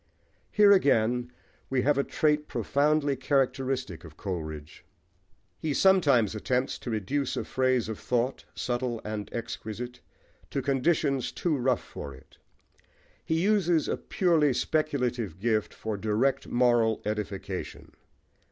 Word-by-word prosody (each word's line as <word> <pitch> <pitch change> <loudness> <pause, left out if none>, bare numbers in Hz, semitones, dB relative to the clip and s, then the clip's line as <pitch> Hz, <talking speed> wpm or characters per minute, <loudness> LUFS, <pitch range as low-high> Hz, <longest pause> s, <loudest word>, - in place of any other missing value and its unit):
Here, 210 -1 +6
again, 125 - +3 0.4
we 130 -1 +1
have 145 +1 +3
a - - +3
trait 150 0 +1
profoundly 145 0 +1
characteristic 135 - -1
of 80 -2 -13
Coleridge. 80 -6 -6 0.8
He 150 -3 -2
sometimes 145 - +4
attempts 125 +4 -1
to - - -6
reduce 120 +6 -1
a - - -2
phase 130 -3 +1
of 110 -2 -5
thought, 125 +2 -1
subtle 120 -1 -2
and 105 -1 -4
exquisite, 120 +1 -6 0.5
to 135 - -2
conditions 140 -1 +1
too 170 -4 -1
rough 130 -2 +1
for 70 -2 -8
it. 65 - -19 0.8
He 160 0 0
uses 180 -6 +2
a - - 0
purely 160 -7 +2
speculative 125 - -1
gift 110 +1 0
for 110 -2 -4
direct 110 +7 0
moral 120 -3 +2
edification. 100 -3 -4
125 Hz, 125 wpm, -28 LUFS, 110-145 Hz, 0.8 s, Here